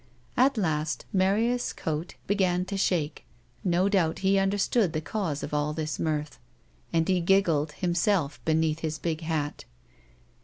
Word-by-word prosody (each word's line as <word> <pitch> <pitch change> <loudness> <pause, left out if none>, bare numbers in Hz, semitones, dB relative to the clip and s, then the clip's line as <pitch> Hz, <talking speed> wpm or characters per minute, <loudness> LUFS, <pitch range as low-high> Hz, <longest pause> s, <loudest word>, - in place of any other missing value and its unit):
At 260 0 +3
last 155 -5 -1
^larius' 215 +6 +1
coat 160 +2 -3
began 185 -3 +1
to 200 - -4
shake; 165 -6 0 0.4
no 180 +1 +2
doubt, 180 -6 +2
he 195 - +4
vmderstood 195 0 +2
the 155 - 0
cause 160 -4 -3
of 150 - -5
all 150 +1 0
this 155 -1 -3
mirth, 150 -2 -2 0.5
and 165 -1 +2
he 185 -2 +2
giggled, 165 -5 +2
himself, 175 -3 0
beneath 160 0 +1
his 160 -1 -3
big 160 0 -2
hat. 155 -3 -3
170 Hz, 145 wpm, -27 LUFS, 155-195 Hz, 0.5 s, he